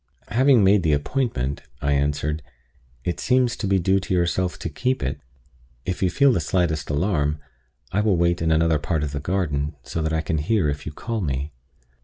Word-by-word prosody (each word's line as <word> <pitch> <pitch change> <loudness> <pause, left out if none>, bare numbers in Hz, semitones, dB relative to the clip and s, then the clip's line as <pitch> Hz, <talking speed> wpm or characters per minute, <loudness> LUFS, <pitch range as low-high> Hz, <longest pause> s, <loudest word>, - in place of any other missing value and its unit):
"Having 130 -2 +4
made 100 +1 +5
the 80 -3 +2
appointment," 75 - -1 0.2
I 70 - 0
answered, 75 +2 0 0.6
"it 85 - -2
seems 125 -2 +2
to 105 - -2
be 95 0 +3
due 95 +2 +2
to 95 -1 -2
yourself 90 +1 0
to - - -4
keep 125 - -1
it. 65 - -3 0.6
If 90 - -3
you 95 - +3
feel 140 +6 +4
the - - +1
slightest 80 -2 0
alarm, 75 -1 +1 0.5
I 100 - +1
will 105 -4 +2
wait 85 0 +2
in 80 - +1
another 80 -1 +3
part 80 0 -1
of 75 - -2
the 70 - -3
garden, 75 -4 -1
so 85 - -4
that 80 0 -1
I 80 0 +1
can 80 0 -1
hear 85 0 +1
if 70 +1 -4
you - - -3
call 115 +8 -4
me." 70 -2 -2
85 Hz, 200 wpm, -23 LUFS, 75-95 Hz, 0.6 s, made